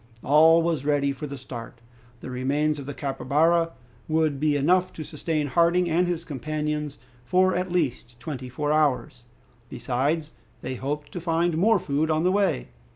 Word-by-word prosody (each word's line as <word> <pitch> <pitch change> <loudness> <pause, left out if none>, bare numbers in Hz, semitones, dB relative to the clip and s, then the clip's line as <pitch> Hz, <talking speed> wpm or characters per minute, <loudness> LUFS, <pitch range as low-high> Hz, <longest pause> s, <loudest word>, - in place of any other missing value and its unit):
All 160 +4 +6
was 165 -5 0
ready 145 -1 +1
for 140 +2 -6
the 140 0 -7
start. 120 -3 -9 0.4
The - - -7
remains 145 +4 0
of 140 - -8
the 145 - -4
capybara 155 +5 +1 0.3
would 155 -3 +1
be 150 0 +2
enough 180 +6 +2
to 155 - -6
sustain 155 0 -2
Harding 170 +4 +2
and 175 +2 +2
his 170 -1 -3
companions 150 +1 -3 0.3
for 185 +8 +2
at 180 0 -2
least 125 -8 -2
twenty 130 -2 -6
four 150 +3 -1
hours. 145 -4 0 0.4
Besides, 140 +6 -1 0.3
they 130 - -4
hoped 145 +3 -4
to 175 - -5
find 170 0 0
more 215 +7 +4
food 155 -2 -1
on 155 +1 +1
the 180 - +3
way. 195 - 0
150 Hz, 165 wpm, -25 LUFS, 140-165 Hz, 0.4 s, All